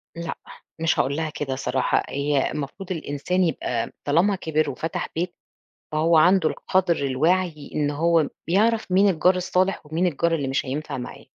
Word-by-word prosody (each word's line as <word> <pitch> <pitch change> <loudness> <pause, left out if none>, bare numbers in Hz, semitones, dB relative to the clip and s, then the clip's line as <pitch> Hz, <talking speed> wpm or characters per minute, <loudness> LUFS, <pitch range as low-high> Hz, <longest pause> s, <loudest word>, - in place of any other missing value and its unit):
لأ، 170 -1 -5 0.4
مش 165 0 +1
هاقول 140 +2 +1
لها 160 0 -2
كده 135 -3 -4
صراحة، 130 -1 0
هي 140 0 0
المفروض 165 +7 -6
الإنسان 170 +2 -1
يبقى 125 -8 -1 0.2
طالما 175 +7 +3
كِبر 155 -3 0
وفتح 160 - -4
بيت، 175 +2 -2 0.6
فهو 160 +2 +3
عنده 175 0 +5
القدْر 185 -3 +1
الواعي 155 +3 0
إن 145 -1 +1
هو 165 +1 +2 0.2
بيعرَف 215 +3 +2
مين 195 +2 +5
الجار 180 +1 +3
الصالح 185 -1 0
ومين 165 +4 0
الجار 170 +1 +1
اللي 140 -4 -2
مش 135 +2 -1
هينفع 140 +2 -4
معاه. 125 - -8
160 Hz, 160 wpm, -24 LUFS, 145-180 Hz, 0.6 s, عنده